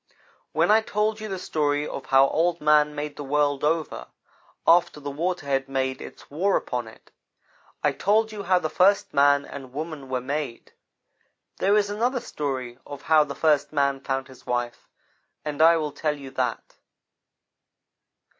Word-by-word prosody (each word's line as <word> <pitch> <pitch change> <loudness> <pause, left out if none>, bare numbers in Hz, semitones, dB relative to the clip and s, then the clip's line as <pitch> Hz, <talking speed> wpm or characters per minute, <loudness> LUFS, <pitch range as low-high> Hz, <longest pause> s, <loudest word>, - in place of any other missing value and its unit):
"When - - +2
I 220 +1 +6
told 215 0 -1
you 215 - -5
the 190 - -3
story 150 -4 -1
of - - -7
how 135 -1 +5
Old 170 +1 +1
man 150 0 +3
made 150 0 -5
the 145 - -5
world 145 0 0
over, 160 +1 -1 0.6
after 170 -3 +4
the 145 -1 -5
water 170 +3 -2
had 135 -1 -1
made 130 -1 -2
its - - -11
war 190 +7 +2
upon 125 -3 -4
it, 110 - -16 0.7
I - - +3
told 220 +2 +1
you 210 -1 -6
how 185 -1 +3
the 180 - -1
first 200 +5 +2
man 145 0 +4
and 130 -3 -10
woman 150 -2 -6
were 130 -1 -1
made. 140 -1 -5 0.8
There 200 +2 +3
is 205 -1 +1
another 245 +5 0
story 130 - -4
of 145 -1 -10
how 155 -1 +5
the 140 -1 -7
first 150 0 +2
man 140 -2 +1
found 135 -1 -2
his 130 -1 -16
wife, 120 -1 -3 0.6
and 150 0 -2
I 165 +1 +7
will 150 -2 -2
tell 150 +1 -2
you 135 -2 -10
that. 125 -3 -3
150 Hz, 170 wpm, -25 LUFS, 135-175 Hz, 0.8 s, I